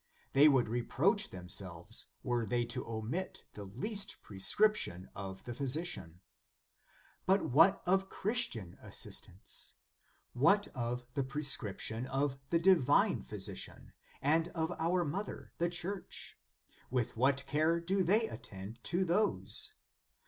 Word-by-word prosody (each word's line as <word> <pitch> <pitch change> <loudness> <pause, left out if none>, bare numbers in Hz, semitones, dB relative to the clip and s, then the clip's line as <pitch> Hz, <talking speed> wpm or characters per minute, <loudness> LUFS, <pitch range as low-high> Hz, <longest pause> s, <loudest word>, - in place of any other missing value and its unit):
They 140 +3 +8
would 130 -5 +3
reproach 145 - +1
themselves, 90 -2 -3 0.2
were 120 -1 0
they 120 +1 0
to 120 +2 -4
omit 115 +12 -4
the 105 - -8
least 200 - -2
prescription 100 - +2
of 95 -1 -7
the 120 - -5
phy 140 +4 -3
sician. 130 - -3 1.1
But 190 -7 +3
what 165 +9 +5
of 190 +1 +2
Christian 195 - -2
assistance? 95 - -6 0.6
What 200 +12 +4
of 125 -1 -3
the 140 - 0
prescription 130 -4 +2
of 135 0 -1
the 170 - +3
Divine 165 -6 +4
Phy - - -9
sician, - - -5 0.3
and 160 +4 +3
of 160 0 -1
our 175 +2 +1
Mother, 195 +8 -5
the 170 +1 +2
Church? 180 +3 -5 0.5
With 125 -1 -1
what 135 +3 +2
care 155 +4 +2
do 190 +3 +1
they 210 +6 +3
attend 100 - -9
to 180 +2 +1
those 115 - +1
140 Hz, 125 wpm, -34 LUFS, 115-180 Hz, 1.1 s, They